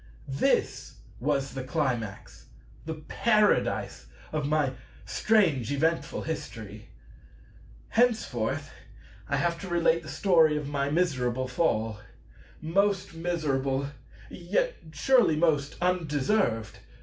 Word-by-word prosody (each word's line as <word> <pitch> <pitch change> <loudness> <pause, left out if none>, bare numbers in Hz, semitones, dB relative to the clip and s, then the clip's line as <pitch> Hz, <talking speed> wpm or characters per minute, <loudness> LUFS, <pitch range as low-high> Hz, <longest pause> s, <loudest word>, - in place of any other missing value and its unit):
This 65 - 0 0.2
was 135 0 -1
the 135 -1 -4
Climax, 125 - -3 0.4
the 160 - -3
Paradise, 210 - +1 0.2
of 150 -2 -1
my 150 -3 +1 0.3
strange 165 - +2
eventful 160 +4 0
History. 110 -10 -6 1.0
Henceforth 220 - 0 0.6
I - - +1
have 170 -1 0
to 195 - -7
relate 170 -1 +2
the 155 - -10
story 165 -6 +4
of 150 -1 -4
my 140 -1 -1
miserable 130 -6 0
Fall:—most 160 - -2
miserable, 140 -5 -1 0.4
yet 200 - -1 0.2
surely 230 - +4
most 150 -3 +1
undeserved! 160 - 0
155 Hz, 95 wpm, -28 LUFS, 130-175 Hz, 1.0 s, story